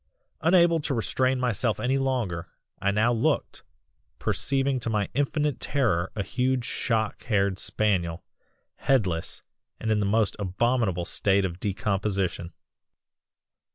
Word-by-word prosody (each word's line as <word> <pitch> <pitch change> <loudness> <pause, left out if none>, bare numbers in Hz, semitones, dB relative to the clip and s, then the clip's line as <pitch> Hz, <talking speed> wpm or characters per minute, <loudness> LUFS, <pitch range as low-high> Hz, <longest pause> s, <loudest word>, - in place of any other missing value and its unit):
"Unable 170 0 +4
to 145 -2 -2
restrain 130 +3 +1
myself 120 -2 0
any 135 +2 +1
longer, 115 -11 -1 0.3
I 100 - +2
now 110 +4 +2
looked, 115 - 0 0.6
perceiving 135 +6 0
to 120 - -1
my 105 -2 0
infinite 145 +1 0
terror 110 -11 0
a 105 - -1
huge 125 +2 0
shock 110 -3 -1
haired 100 -4 +1
spaniel, 90 -6 0 0.5
headless, 95 -12 0 0.4
and 110 - -1
in 110 - +2
the 100 - +1
most 110 0 +2
abominable 100 -2 0
state 100 +2 +2
of 85 -1 -5
decomposition. 100 -4 -1
110 Hz, 120 wpm, -26 LUFS, 95-130 Hz, 0.6 s, Unable